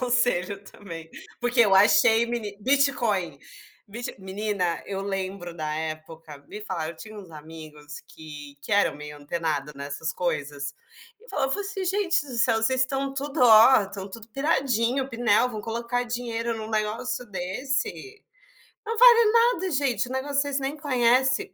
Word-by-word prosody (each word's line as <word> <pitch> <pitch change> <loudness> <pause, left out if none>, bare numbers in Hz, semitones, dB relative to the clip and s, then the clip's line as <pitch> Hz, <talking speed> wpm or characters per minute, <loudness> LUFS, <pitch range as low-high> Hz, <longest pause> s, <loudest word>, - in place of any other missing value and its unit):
conselho 240 -6 0
também, 165 -6 -10 0.3
porque 245 0 +2
eu 205 -4 +5
achei 225 +3 +5
meni 220 -4 -4
Bitcoin, 235 - +1 0.5
Bit 230 0 -7
menina, 190 -2 -2
eu 195 -1 -4
lembro 190 -3 -4
da 155 -1 -3
época 155 -1 -6
me 210 - -8
falaram 175 -6 -4
eu 170 - -12
tinha 215 +7 -11
uns 190 -5 -11
amigos 150 -1 -11
que 150 -2 -11
que 180 - -6
eram 205 -6 +3
meio 150 0 -9
antenado 150 -1 -3
nessas 145 +3 -4
coisas 145 -5 -3 0.5
e 480 - -21
falava 270 - -1
fala 410 - -1
assim: 395 -1 -4
"Gente 375 -3 +1
do 260 - -8
céu, 230 -1 +3
vocês 260 +2 +2
estão 270 +1 -1
tudo, 280 0 -4
ó, 225 +1 +8
estão 195 0 -7
tudo 220 +2 -11
piradinho, 265 -2 0
pinel, 240 -1 +2
vão 215 -3 -5
colocar 235 +3 -2
dinheiro 235 -1 -3
num 220 0 -6
negócio 230 +4 -2
desse. 260 - -4 0.6
Não 455 +1 -3
vale 470 -2 +7
nada, 465 -5 +3
gente, 270 -3 0
o 250 - -9
negócio 280 +2 0
vocês 285 -1 -1
nem 275 +3 -3
conhece". 260 -2 +2
225 Hz, 155 wpm, -25 LUFS, 175-265 Hz, 0.6 s, ó